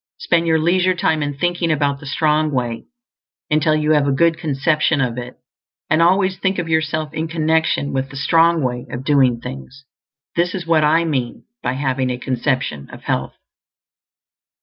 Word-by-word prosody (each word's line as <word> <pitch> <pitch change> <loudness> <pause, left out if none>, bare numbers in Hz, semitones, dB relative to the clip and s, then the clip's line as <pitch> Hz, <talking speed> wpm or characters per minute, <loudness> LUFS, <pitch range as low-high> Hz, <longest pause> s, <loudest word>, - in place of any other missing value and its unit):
Spend 170 -1 +1
your 160 -1 +3
leisure 180 +3 +2
time 160 -4 +1
in 145 -1 -2
thinking 175 +1 0
about 140 -2 0
the 145 - -10
Strong 155 +1 +1
Way, 120 -4 -3 0.6
until 155 0 +3
you 155 0 +1
have 150 -2 +3
a - - +2
good 165 +4 +3
conception 155 0 0
of 125 -2 -1
it; 125 +1 -8 0.6
and 155 +1 +4
always 185 +2 +2
think 190 0 0
of 175 -2 -2
yourself 155 -1 -1
in 160 0 -2
connection 160 -3 0
with 135 0 -2
the 140 - -11
Strong 165 +3 +3
Way 125 0 -3
of 120 +2 -6
Doing 130 -4 +3
Things. 135 +2 -9 0.5
That 175 +2 0
is 180 -3 -5
what 165 -2 +3
I 160 +3 +3
mean 130 -7 -3 0.2
by 125 - -1
having 130 -1 -1
a 125 - -2
Conception 125 - -2
of - - -12
Health. - - -2
150 Hz, 175 wpm, -19 LUFS, 135-165 Hz, 0.6 s, and